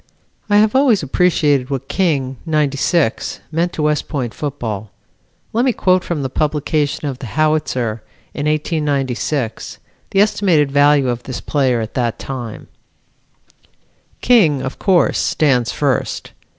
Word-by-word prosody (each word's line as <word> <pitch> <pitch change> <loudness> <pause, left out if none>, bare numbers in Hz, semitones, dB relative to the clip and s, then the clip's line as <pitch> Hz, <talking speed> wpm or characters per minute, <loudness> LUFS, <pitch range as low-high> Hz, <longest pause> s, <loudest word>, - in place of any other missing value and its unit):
I 205 - +4
have 215 +3 +3
always 260 - +4
appreciated 145 -3 +2
what 135 -1 -4
King, 140 -9 0
'96, 150 -2 0
meant 170 +2 0
to 155 - -2
West 150 0 0
Point 130 -7 -3
football. 115 -8 -4 0.6
Let 235 +2 +2
me 255 -2 +2
quote 185 -3 +2
from 155 -5 -3
the - - 0
publication 150 +1 -1
of 135 -2 -5
the 130 - -7
Howitzer, 130 -5 0 0.3
in 145 0 -3
1896, 145 -5 -1 0.3
the 195 - +1
estimated 180 -9 +2
value 145 -1 +4
of 120 -1 -2
this 130 -1 -6
player 130 -5 0
at 110 - -6
that 120 -3 -1
time: 120 -5 -7 1.5
"King, 165 - +4
of 130 - -5
course, 185 -3 +2
stands 125 -6 +1
first. 140 -3 -1
145 Hz, 135 wpm, -18 LUFS, 130-160 Hz, 1.5 s, I